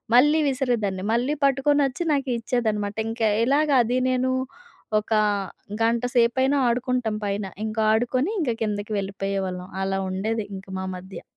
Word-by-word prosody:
మళ్ళీ 295 +5 +6
విసిరేదాన్ని. 235 -8 -1
మళ్ళీ 245 +5 +1
పట్టుకొనొచ్చి 275 +2 +2
నాకు 275 -2 -1
ఇచ్చేదనమాట. 220 -4 -1
ఇంకా 225 -1 +1 0.2
ఇలాగ 290 +4 +2
అది, 245 +2 0
నేను 255 0 +1 0.7
ఒక 210 - -21 0.7
గంట 230 +1 +2
సేపైనా 260 +4 +3
ఆడుకుంటాం 245 -2 0
పైన. 200 0 -2 0.2
ఇంకా 220 0 -1
ఆడుకొని, 255 - +1
ఇంక 270 -7 +1
కిందకి 210 0 -3
వెళ్ళిపోయేవాళ్ళం. 195 -2 -3 0.2
అలా 195 0 -1
ఉండేది 215 +3 -2
ఇంక 190 - -11
మా 190 - -3
మధ్య. 190 +1 -10
230 Hz, 130 wpm, -24 LUFS, 205-260 Hz, 0.7 s, మళ్ళీ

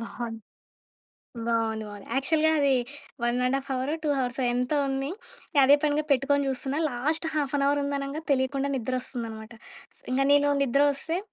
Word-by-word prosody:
బావుంది. 230 -1 -6 1.1
బావుంది, 225 -1 0
బావుంది. 205 -1 -10
యాక్చువల్‌గా 315 +4 +2
అది 280 -1 +3 0.5
వన్ 240 +1 +1
అండ్ 255 +2 +2
హాఫ్ 275 - -7
హవురో 260 +3 -1
టూ 305 - 0
హవర్సో 250 0 -1
ఎంతో 250 +4 0
ఉంది 270 +1 -2 0.5
అదే 275 +2 +7
పనిగా 300 0 +2
పెట్టుకొని 280 +1 +3
జూస్తున్నా, 270 +1 -2
లాస్ట్ 300 +7 -1
1/2 285 -1 +1
ఉందనంగా 280 +1 -3
తెలియకుండా 275 +1 +1
నిద్ర 255 -2 -3
వద్రొస్తుందన్నమాట. 230 -3 -5 0.6
ఇంగ 260 +2 +2
నేను 290 0 +5
నిద్రొస్తే 285 +5 +1
270 Hz, 140 wpm, -27 LUFS, 245-285 Hz, 1.1 s, అదే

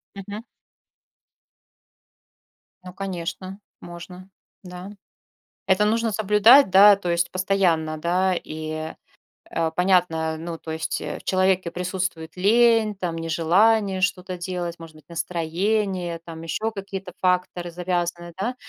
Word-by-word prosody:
Мгм. 205 +3 -7 2.4
Ну 180 0 -10
конечно, 185 0 -5 0.2
можно. 180 +2 -10 0.3
Да. 180 +1 -9 0.8
Это 190 +2 +3
нужно 225 +1 +1
соблюдать, 215 +5 +6
да, 200 +2 +8
то 180 -3 -4
есть 170 0 0
постоянно, 180 -5 +1
да, 180 +3 +1
и, 155 -1 -5 0.6
а, 165 -1 0
понятно, 170 -3 +1
ну, 165 +1 -6
то 160 0 -8
есть, 160 0 -3
э, - - -5
в - - -18
человеке 185 -1 +1
присутствует 180 -2 -4
лень, 220 +2 +3
там, 180 -3 -3
нежелание 185 +5 +2
что-то 185 -1 -1
делать, 175 -1 -4
может 165 -1 -12
быть, 155 - -18
настроение, 175 +2 -2
там 165 -1 -8
еще 215 +7 -2
какие-то 195 -3 -7
факторы 180 -1 0
завязаны, 175 0 -3
да. 240 +6 -2
180 Hz, 120 wpm, -23 LUFS, 170-195 Hz, 2.4 s, да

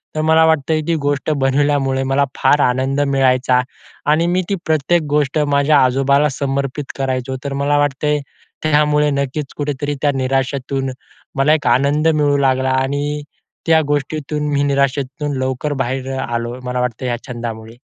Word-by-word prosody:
तर 155 - 0
मला 160 +1 +4
वाटतं 160 0 +2
ती 170 - +2
गोष्ट 145 +1 -1
बनवल्यामुळे, 135 0 +1
मला 135 +1 +1
फार 145 - +3
आनंद 130 +3 +1
मिळायचा 130 -2 +2 0.5
आणि 165 +3 +2
मी 180 +1 +1
ती 200 - +1
प्रत्येक 160 +2 +2
गोष्ट 145 0 +1
माझ्या 140 +1 +3
आजोबाला 140 +3 +2
समर्पित 140 +1 -3
करायचो. 130 -1 -2
तर 140 -1 -3
मला 140 +1 +1
वाटतंय 145 +1 +1 0.4
त्यामुळे 150 -1 +3
नक्कीच 140 +1 -3
कुठेतरी 145 0 -2
त्या 145 - +3
निराशेतून 135 0 -1 0.4
मला 140 +3 +3
एक 155 - 0
आनंद 145 +4 +2
मिळू 150 -3 +2
लागला 130 -1 +1
आणि 145 +3 -1 0.4
त्या 160 -1 +4
गोष्टीतून 150 +1 -2
मी 140 0 +2
निराशेतून 140 0 -1
लवकर 130 +3 -2
बाहेर 130 +2 -3
आलो 120 0 -3
मला 125 0 -3
वाटतं 125 0 -3
या 120 -1 -1
छंदामुळे. 115 -2 -6
140 Hz, 150 wpm, -18 LUFS, 130-150 Hz, 0.5 s, मला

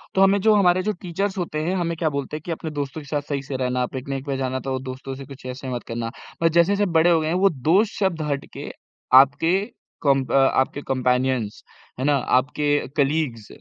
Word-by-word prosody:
तो 190 - +4
हमें 195 +1 +5
जो 215 +2 +5
हमारे 185 -2 +4
जो 215 - 0
टीचर्स 190 +3 -2
होते 165 -4 -2
हैं 180 +4 0
हमें 170 -2 -1
क्या 160 -1 +1
बोलते 140 +1 -4
हैं - - -11
कि 175 - -4
अपने 160 -1 -4
दोस्तों 145 +1 -4
के 145 - -14
साथ 145 0 -1
सही 140 -2 -1
से 140 -1 -4
रहना, 125 -1 0
पिकनिक 135 +1 -4
पे 140 -2 -2
जाना 130 0 -2
तो 130 -1 -1
दोस्तों 130 +1 -6
से 135 - -9
कुछ 135 -2 -12
ऐसा 130 +1 -6
मत 120 - -5
करना। 115 0 -3 0.4
मगर 165 - +5
जैसे-जैसे 180 +5 +3
बड़े 165 +1 +4
हो 165 - +4
गए 155 - -2
हैं, 160 - 0
वो 195 +2 +4
दोस्त 170 - +2
शब्द 190 -5 0
हट 140 0 -2
के - - -6 0.4
आपके 140 +6 +6 0.5
कॉम्प 135 -2 +2
अ, - - +2
आपके 135 +1 +2
कम्पैनियन्स 125 -3 0 0.4
है 130 - -1
ना, 145 0 +4
आपके 145 +3 +1
कलीग्स 140 -6 0
145 Hz, 220 wpm, -23 LUFS, 130-170 Hz, 0.5 s, आपके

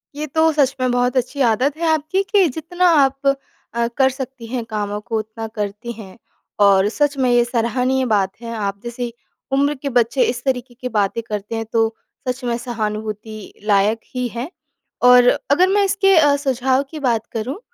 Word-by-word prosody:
ये 300 +1 -3
तो 320 +3 +2
सच 280 -3 +2
में 255 -1 +2
बहुत 245 +1 +1
अच्छी 255 +3 -1
आदत 265 +7 0
है 335 0 -1
आपकी 315 +5 0
कि 400 -4 +5
जितना 350 +3 -1 0.2
आप 270 +1 0 0.5
अ, 235 0 0
कर 265 -1 +5
सकती 265 -2 -7
हैं 240 0 -3
कामों 210 -1 -3
को, 225 +1 -3
उतना 220 +1 -6
करती 210 +1 -5
हैं। 195 -2 -11 0.4
और 200 -1 +5
सच 290 +4 0
में 260 -2 +2
ये 240 0 +4
सराहनीय 250 +2 0
बात 200 -5 +1
है। 230 -1 -6
आप 200 -2 -3
जैसी 240 0 -5 0.4
उम्र 280 +2 +2
के 280 - -2
बच्चे 245 +1 +2
इस 240 0 -4
तरीके 255 -2 -2
की 250 - -3
बातें 210 0 0
करते 210 +1 -4
हैं, 225 0 -3
तो 225 0 0 0.3
सच 250 +1 -2
में 240 -1 -1
सहानुभूति 215 -2 -5
लायक 210 +1 +2 0.2
ही 250 0 -1
हैं। 240 +5 -5 0.6
और 250 0 +7 0.2
अगर 360 +6 +5
मैं 405 +1 +3
इसके 390 0 +3
अ, 290 -3 +5
सुझाव 265 -1 +1
की 315 - -6
बात 235 -5 0
करूँ, 245 - -3
245 Hz, 185 wpm, -20 LUFS, 220-275 Hz, 0.6 s, और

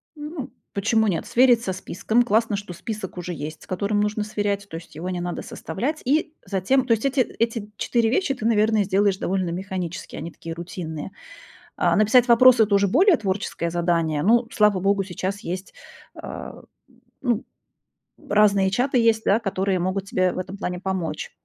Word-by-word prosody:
Ну, 300 -2 -7 0.2
почему 220 +2 +2
нет? 175 -4 -1
Сверить 245 -1 +4
со 190 - -2
списком. 220 +6 0
Классно, 225 -1 +1
что 200 -3 -7
список 210 -3 -6
уже 175 0 -4
есть, 155 +1 -7
с - - -16
которым 200 +3 -1
нужно 210 0 -1
сверять, 205 -1 -2
то - - -8
есть 165 -2 -13
его 175 +4 -5
не 180 -1 -3
надо 175 0 -4
составлять. 250 - -4
И 305 +3 +1
затем 230 +8 +1
то 240 - -2
есть 225 +4 -1
эти 270 -1 +2
эти 230 -3 -2
4 230 -2 +1
вещи 320 0 +1
ты, 225 -4 -6
наверное, 215 -1 +3
сделаешь 195 0 +2
довольно 185 -2 -1
механически, 180 -2 -5
они 165 - -6
такие 165 0 -8
рутинные. 165 -3 -6 0.7
А - - +2
написать 240 +4 +4
вопросы- 240 0 +7
это 205 -1 0
уже 200 0 +3
более 345 - +5
творческое 190 -5 -2
задание. 170 -3 0
Ну, 230 +5 +3
слава 210 -3 +3
богу, 195 +1 +2
сейчас 190 +2 -4
есть, 185 -1 -6 0.4
а, - - -8 0.3
м, - - -26 0.2
ну, 240 -3 0 0.8
разные 200 -2 +4
чаты 250 +4 +1
есть, 225 -1 +3
да, 205 - +4
которые 195 -2 -1
могут 185 +2 -1
тебе 185 -1 +1
в - - -6
этом 185 +2 -5
плане 180 -2 -4
помочь. 185 -5 -3
200 Hz, 180 wpm, -23 LUFS, 185-230 Hz, 0.8 s, вопросы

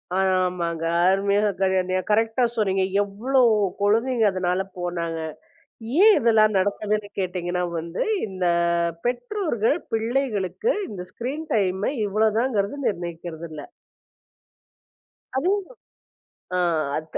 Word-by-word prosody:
ஆ. - - +1 0.3
ஆமாங்க. 170 -2 -2 0.2
அருமையா 200 +2 +3 0.2
கரென்யா 185 -1 +1
கரெக்டா 225 +3 +2
சொன்னீங்க. 190 -3 +1 0.2
எவ்ளோ 240 +7 0 0.4
குழந்தைங்க 225 +3 +2
அதனால 185 0 0 0.2
போனாங்க. 170 -2 -3 0.8
ஏன் 430 -1 +8
இதெல்லாம் 215 -2 +4
நடக்குதுன்னு 205 +2 -1
கேட்டீங்கன்னா 180 -1 -2 0.2
வந்து, 170 +2 -3 0.2
இந்த 190 -2 -4 0.6
பெற்றோர்கள் 245 - 0 0.2
பிள்ளைகளுக்கு 230 - 0 0.2
இந்த 185 -4 -6
ஸ்கிரீன் 285 +7 -5
டைமை 190 0 +1 0.2
இவ்வள 215 +2 +2
தாங்கிறது 235 0 -1
நிர்ணயிக்கிறது 170 -2 -5
இல்ல. 150 -2 -8 1.7
அதே 330 +8 +1
தான் 400 - -4 0.9
ஆ, - - +2 0.4
அத் 155 0 -5
200 Hz, 100 wpm, -24 LUFS, 180-230 Hz, 1.7 s, ஏன்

